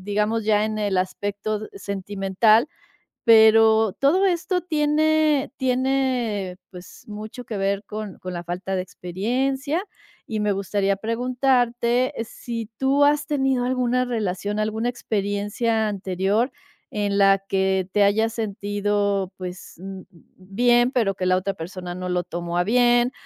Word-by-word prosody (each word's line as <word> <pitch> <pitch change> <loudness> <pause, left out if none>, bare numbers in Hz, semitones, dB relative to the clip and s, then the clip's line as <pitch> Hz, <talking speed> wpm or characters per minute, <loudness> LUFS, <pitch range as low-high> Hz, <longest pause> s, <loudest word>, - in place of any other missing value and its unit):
digamos 210 +3 0
ya 210 -1 +3
en 215 0 -3
el 205 -3 0
aspecto 205 +3 -2
sentimental, 200 +4 +1 0.6
pero 220 -1 +6
todo 340 +8 +3
esto 360 0 0
tiene 305 -2 +2
tiene, 255 -7 0 0.2
pues, 180 0 -12
mucho 215 +4 -7
que 220 -3 -5
ver 200 +1 -1
con 210 -2 -7
con 185 - -6
la 175 -1 -6
falta 185 +2 -3
de 185 - -1
experiencia. 265 - -2 0.4
Y 220 -2 -3
me 210 -1 +1
gustaría 195 0 0
preguntarte 245 +2 +1
si 230 -1 -6
tú 275 +2 +3
has 295 0 +3
tenido 265 -4 +1
alguna 250 0 +1
relación, 210 -3 -2
alguna 220 +2 -1
experiencia 215 0 -1
anterior 195 +5 0 0.4
en 205 -1 -1
la 195 0 +6
que 190 -1 0
te 205 - +2
hayas 220 +3 +2
sentido, 205 -2 -1
pues, 180 0 -8 0.6
bien, 240 +6 +2
pero 225 -7 +1
que 185 - -2
la 185 - +4
otra 190 +2 -1
persona 180 +1 -7
no 180 0 -5
lo 180 0 0
tomó 175 +1 -4
a 175 - +3
bien, 240 +3 +3
215 Hz, 135 wpm, -23 LUFS, 195-245 Hz, 0.6 s, pero